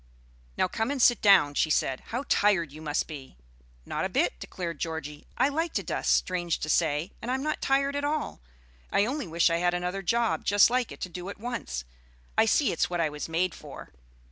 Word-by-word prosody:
"Now - - +2
come 225 +5 -2
and 285 -1 -2
sit 240 -1 +5
down," 195 -8 +6
she 155 - +1
said. 135 -3 +1
"How 245 +4 -3
tired 190 -7 +2
you 155 +2 -11
must 150 -1 -1
be!" 140 - -10 0.5
"Not - - -3
a - - -1
bit," - - 0
declared 170 - -6
Georgie; 160 -3 -5
"I 260 - +4
like 325 +4 -2
to - - -1
dust, - - +1
strange 175 -2 -1
to 155 - -3
say, 155 +2 +1
and 240 - -5
I'm 260 +1 -1
not 305 0 -2
tired 275 +1 +1
at 285 - -2
all; 295 - -2 0.5
I 200 - +3
only 270 -1 -3
wish 170 +1 +2
I 165 - +2
had 175 +1 +1
another 180 +2 -2
job 230 +4 0
just 205 +3 +5
like 250 -1 0
it - - -11
to 185 - -3
do 180 +2 -7
at - - -7
once. 220 - -4 0.5
I 220 - +4
see 275 +5 +3
it's - - 0
what 175 -1 -2
I 160 -2 +2
was 150 +2 -6
made 170 +2 0
for." - - -11
180 Hz, 220 wpm, -28 LUFS, 160-240 Hz, 0.5 s, down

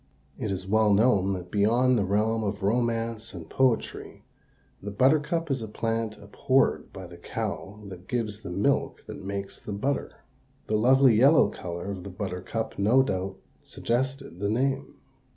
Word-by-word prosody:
It 105 - -2
is 95 -1 -3
well 110 +2 +3
known 100 -2 +3
that 90 -1 -6
beyond 120 +5 +3
the 105 - +2
realm 110 +3 +1
of 100 -1 -3
romance 115 0 -1
and 80 -2 -8
poetry 130 +1 -1 0.6
the 105 - -5
buttercup 150 - +2
is 130 -3 -1
a 110 - -5
plant 115 0 -2
abhorred 130 +6 0
by 95 - -8
the 85 0 -12
cow 100 +4 -5
that 95 -2 -10
gives 110 -3 -2
the - - -7
milk 100 +10 0
that - - -9
makes 100 0 -5
the 105 - -6
butter. 135 +8 -2 0.5
The 110 - -1
lovely 130 +3 +5
yellow 135 +8 +6
color 85 +2 -6
of 95 -3 -6
the 100 - -7
buttercup 95 +4 -4
no 115 +7 +5
doubt 95 -5 -3 0.2
suggested 130 - -3
the 100 +1 -1
name. 135 +4 -1
110 Hz, 160 wpm, -27 LUFS, 100-125 Hz, 0.6 s, yellow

